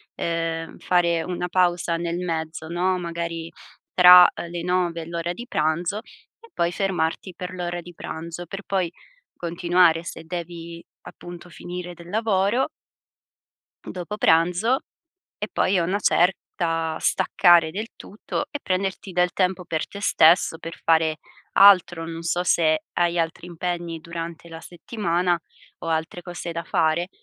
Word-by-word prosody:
uhm, 165 -1 -3
fare 170 -2 +1
una 180 0 -3
pausa 175 -2 +1
nel 170 0 -3
mezzo, 160 -2 -4
no? 180 +2 0
Magari 170 -1 -4 0.4
tra 180 0 +10 0.2
le 175 0 -5
9:00 175 -1 0
e 160 - -9
l'ora 170 +1 -3
di 240 +6 -9
pranzo, 170 +4 -1 0.4
e 460 - -18
poi 170 0 0
fermarti 180 -1 -2
per 180 +2 -6
l'ora 175 -1 -3
di 175 +1 -12
pranzo, 170 +2 -7
per 195 +3 -7
poi 185 -4 -1 0.5
continuare, 170 -1 +2
se 165 - -8
devi 170 0 -7 0.2
appunto 175 0 -11
finire 175 +1 -7
del 170 0 -13
lavoro 215 +3 +1 1.1
dopo 185 +3 -6
pranzo, 180 +9 +3 0.6
e - - -3
poi 195 - +2
a - - +2
una 190 +4 0
certa 165 -4 0
staccare 175 -3 +4
del 210 +7 -5
tutto 220 +7 -5
e 290 - -4
prenderti 190 +1 -2
del 180 0 +2
tempo 185 -1 0
per 160 -2 -2
te 200 - -9
stesso, 165 -3 +4
per 165 +1 -8
fare 160 -1 +2 0.3
altro, 180 -4 +6
non 165 0 -6
so 170 +1 0
se 155 -3 +2
hai 175 0 +1
altri 165 +1 -2
impegni 175 -1 -4
durante 170 0 -7
la 165 -1 -9
settimana 175 -2 -1 0.4
o - - -8
altre 160 +2 -2
cose 175 -1 -6
da 170 0 -4
fare, 160 +2 +1
175 Hz, 145 wpm, -23 LUFS, 165-180 Hz, 1.1 s, tra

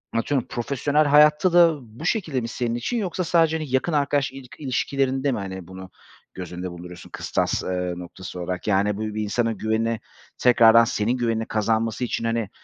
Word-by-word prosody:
atıyorum, 130 +3 0
profesyonel 145 +5 0
hayatta 150 +4 +5
da 170 -3 +6
bu 120 +7 -11
şekilde 165 - 0
mi 115 - -4
senin 115 0 -2
için 180 - -2
yoksa 185 -4 -2
sadece, 165 -2 +2
hani, 155 -3 -6
yakın 130 +6 0
arkadaş 140 -2 +1
ilik 135 -2 -12
ilişkilerinde 135 0 0
mi, - - -2
hani, 95 -2 -7
bunu 95 0 -10 0.4
göz 90 -2 -7
önünde 90 0 -5
bulunduruyorsun 90 0 -10
kıstas, - - -1
eee, 90 -1 -2
noktası 90 +1 -8
olarak? 90 +2 -4
Yani, 100 0 +2
bu - - -5
bir 110 0 -3
insanın 115 +1 -1
güveni, 110 +1 -1 0.4
tekrardan 115 -2 +6
senin 115 +3 0
güvenini 115 -2 -1
kazanması 110 +2 0
için, 115 - -3
hani, 115 -3 -1
115 Hz, 175 wpm, -23 LUFS, 105-140 Hz, 0.4 s, da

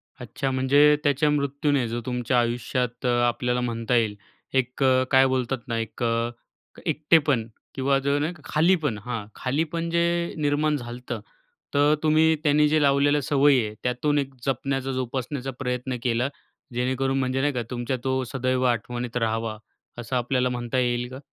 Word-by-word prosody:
अच्छा, 135 - -4
म्हणजे 140 +3 +5
त्याच्या 145 +1 +2
मृत्यूने, 140 -2 0
जो 120 +1 -3
तुमच्या 125 0 0
आयुष्यात 120 +1 -2
अ, - - +3 0.2
आपल्याला 125 +1 0
म्हणता 115 0 -1
येईल, 110 -3 +2 0.4
एक 130 +1 0
अ, 130 -1 +4
काय 130 0 +6
बोलतात 130 0 0
ना 115 -1 -2
एक 115 +2 -5
अ, 115 0 +1 0.6
एकटेपण 145 -7 +2 0.3
किंवा 135 +1 +2
जर 140 +1 +1
नाही 155 +4 -1
खालीपण 155 - +2
हा 120 -3 -3
खालीपण 160 +5 -2
जे 170 0 +1
निर्माण 150 +1 +1
झालंत, 120 -1 -6 0.6
तर 145 +1 +4
तुम्ही 160 +1 +4
त्यांनी 150 0 +4
जे 155 0 +3
लावलेलं 145 +1 +3
सवय 145 +1 +4
आहे 105 -1 -5
त्यातून 125 +4 0
एक 135 -1 -4
जपण्याचा 135 0 -1
जोपासण्याचा 130 +1 -3
प्रयत्न 125 0 -2
केला. 120 +2 +1 0.4
जेणेकरून 130 +2 0
म्हणजे 130 0 0
नाही 145 +1 +1
का 125 - -1
तुमच्या 125 +1 -2
तो 130 0 0
सदैव 130 -1 0
आठवणीत 120 +1 -2
राहावा, 115 -1 -1 0.4
असं 120 +2 -4
आपल्याला 125 +1 +1
म्हणता 120 0 -3
येईल 120 -1 0
का? 130 - -7
130 Hz, 155 wpm, -25 LUFS, 120-145 Hz, 0.6 s, काय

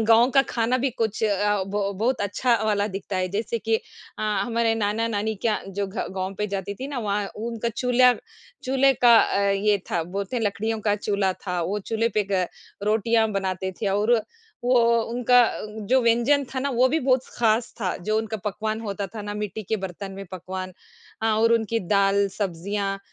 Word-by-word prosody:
गाँव 235 +3 +6
का 270 - +7
खाना 240 +2 +1
भी 265 +1 0
कुछ 225 -3 -2
अ, 205 -1 +1
बहु 200 0 -1
बहुत 230 +6 0
अच्छा 235 +5 +1
वाला 205 -1 +1
दिखता 195 0 -5
है, 185 0 0
जैसे 215 +4 -2
कि 225 0 +1 0.4
अ, - - -3
हमारे 225 +2 +1
नाना-नानी 220 0 -1
का 215 - +2
जो 200 +1 -2
घ 195 +2 -11 0.2
गाँव 190 +1 -3
पे 210 - 0
जाती 200 0 -4
थी 260 +6 -6
ना, 280 -3 -4
वहाँ 205 -2 -1
उनका 230 +1 -3
चूल्हा 250 0 +5 0.5
चूल्हे 270 +1 +4
का 240 -1 +8
अ, 200 - +1
ये 200 +1 +2
था, 170 - +1
बोलते 195 +7 -4
हैं 230 - -1
लकड़ियों 220 +2 -1
का 205 -1 +1
चूल्हा 200 -2 0
था, 180 -2 -4
वो 200 +5 -1
चूल्हे 225 +3 -1
पे 210 - +3
ग 185 -1 +3 0.4
रोटियाँ 220 +1 +2
बनाते 190 -1 -2
थे 215 - -1
और 205 +4 +2 0.5
वो 250 0 +4 0.3
उनका 245 0 +5
अ, 225 - -1 0.2
जो 260 - +5
व्यंजन 240 +5 +3
था - - -1
ना, 280 +1 -1
वो 255 +1 +3
भी 315 +4 +1
बहुत 255 -1 +2
ख़ास 225 0 +2
था, 185 -4 -1
जो 215 +5 -1
उनका 220 0 -3
पकवान 215 +2 -2
होता 200 -2 -4
था 215 - -5
ना, 205 0 -5
मिट्टी 210 +1 -4
के 220 - +1
बर्तन 195 +1 -6
में 195 +1 -7
पकवान 185 +1 -6 0.5
अ, 225 - +2
और 225 +1 +3
उनकी 230 0 +1
दाल, 200 0 +3
सब्ज़ियाँ 195 +1 -2
215 Hz, 195 wpm, -24 LUFS, 200-230 Hz, 0.5 s, का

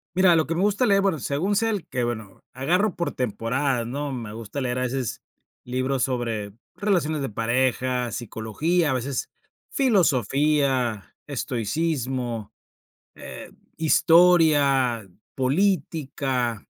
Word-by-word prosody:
Mira, 185 -2 +5
lo 160 -1 +2
que 165 - -1
me 175 - 0
gusta 205 +5 +2
leer, 195 -1 +4
bueno, 190 -6 +1
según 165 +11 -1
sea, 225 +2 +2
el 205 -6 -2
que 125 -2 -2
Bueno, 110 -5 -5
agarro 175 - +1
por 170 - -2
temporadas, 125 +2 -1
¿no?, 140 +4 -4
me 115 -5 -6
gusta 115 +4 -6
leer 125 -1 -1
a - - -1
veces 125 -1 -2 0.4
libros 130 +1 -1
sobre 115 -5 -2 0.2
relaciones 170 -7 0
de 135 - -2
pareja, 125 +2 0
psicología, 125 - -1
a - - +1
veces 130 +1 -3 0.4
filosofía, 140 - +1
estoicismo, 125 -3 -2 0.6
eh, - - -10 0.3
historia, 150 - +4 0.3
política, 135 - 0
135 Hz, 120 wpm, -24 LUFS, 120-165 Hz, 0.6 s, Mira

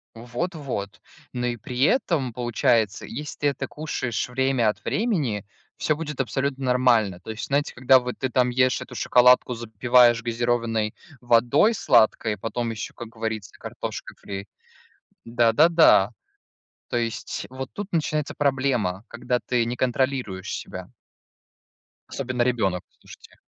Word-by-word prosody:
Вот 125 +10 -4
вот. 125 -10 -5 0.3
Ну 125 0 -2
и 120 -1 -2
при 125 +4 -6
этом, 155 - +1
получается, 115 -3 +1
если 150 0 -7
ты 145 - +1
это 140 - -2
кушаешь 130 -6 -3
время 130 -2 +1
от 105 - -4
времени, 150 - -1 0.3
всё 155 - 0
будет 150 -4 -3
абсолютно 135 +1 -2
нормально. 125 -7 +2
То 100 +5 -8
есть 110 - -6
знаете, 140 +1 0
когда 130 +1 +5
вот 125 0 -5
ты 130 - -1
там 125 0 +2
ешь 130 +1 +2
эту - - -9
шоколадку, 125 0 +4
запиваешь 120 +1 +3
газированной 115 -2 0 0.3
водой 120 - +3
сладкой, 110 - +3
потом 115 +3 -3
ещё, 110 -2 -6
как 115 -2 -9
говорится, 110 -3 -5
картошка - - -6
фри. 100 0 -7 0.8
Да, 115 -1 +2
да, 155 +8 +6
да. 160 - +5 0.8
То - - -2
есть 115 -1 -3
вот 130 0 -6
тут 205 -1 -5
начинается 155 -2 -1
проблема, 130 -9 0
когда 125 +1 -2
ты 120 -1 0
не 120 +1 -3
контролируешь 125 -7 -1
себя. - - -7 1.2
Особенно 130 -2 -2
ребенок, 100 -8 0
слушайте. - - -17
125 Hz, 140 wpm, -24 LUFS, 115-135 Hz, 1.2 s, да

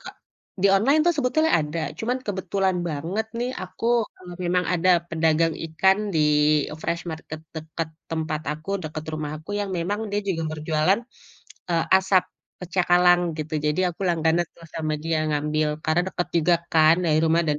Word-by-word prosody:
ka - - -9 0.5
di 200 - +6
online 265 +10 +4
tuh 345 - +4
sebetulnya 315 +4 +2
ada 150 +2 -3 0.2
cuma 240 +3 -1
kebetulan 190 -1 0
banget 170 +9 -3
nih 245 +1 -1
aku, 185 +5 -5 0.3
eee, 180 -1 -10
memang 180 +1 +1
ada 180 +1 +3 0.2
pedagang 160 0 +2
ikan 190 +5 +3 0.2
di, 155 - +3 0.5
eee, 155 - -7
fresh 170 +1 -2
market 160 0 -7 0.2
dekat 160 +1 -4 0.2
tempat 155 -1 -2
aku, 155 +5 -8
dekat 155 0 -5
rumahku 155 +4 -5
yang 200 -1 -3
memang 200 +6 -2
dia 205 - +1
juga 165 -3 -1
berjualan, 155 +6 +1 0.7
eee, 165 -1 +2
asap 190 -1 +3 0.4
cakalang 175 0 +4 0.2
gitu, 155 0 -4
jadi 150 +4 +1
aku - - -8
langganan 165 0 +2
terus 165 - -14
sama 155 -1 -1
dia 160 +1 -1
ngambil 150 +1 0 0.2
karena 160 +2 +2
dekat 175 - -3
juga 170 +2 +4 0.2
kan 160 +1 +6
dari 155 -1 +3
rumah 165 +1 +3
dan 150 -1 +1
165 Hz, 165 wpm, -24 LUFS, 155-190 Hz, 0.7 s, di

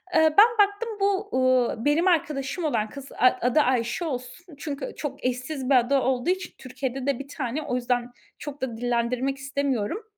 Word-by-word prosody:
Eee, 315 -1 +4
ben 430 +3 +10 0.2
baktım 410 +3 -6
bu, 400 +1 +1
ııı, 255 -2 +2
benim 320 +5 +3
arkadaşım 305 -1 0
olan 220 -7 0
kız, 275 -1 -10
a 255 - +4
adı 250 +5 +3
Ayşe 250 +5 0
olsun. 290 +5 -6
Çünkü 285 -3 -5
çok 280 -3 -5
eşsiz 255 +2 -2
bir 275 - +5
adı 255 +3 +4
olduğu 260 +4 0
için, 375 -1 -1
Türkiye'de 260 0 -5
de 275 -3 0
1 275 - -7
tane. 275 0 -3
O 265 -4 -2
yüzden 245 0 -1 0.3
çok 290 -1 -8
da 240 -4 -3
dillendirmek 245 +3 -1
istemiyorum. 275 - -2
270 Hz, 175 wpm, -25 LUFS, 250-305 Hz, 0.3 s, ben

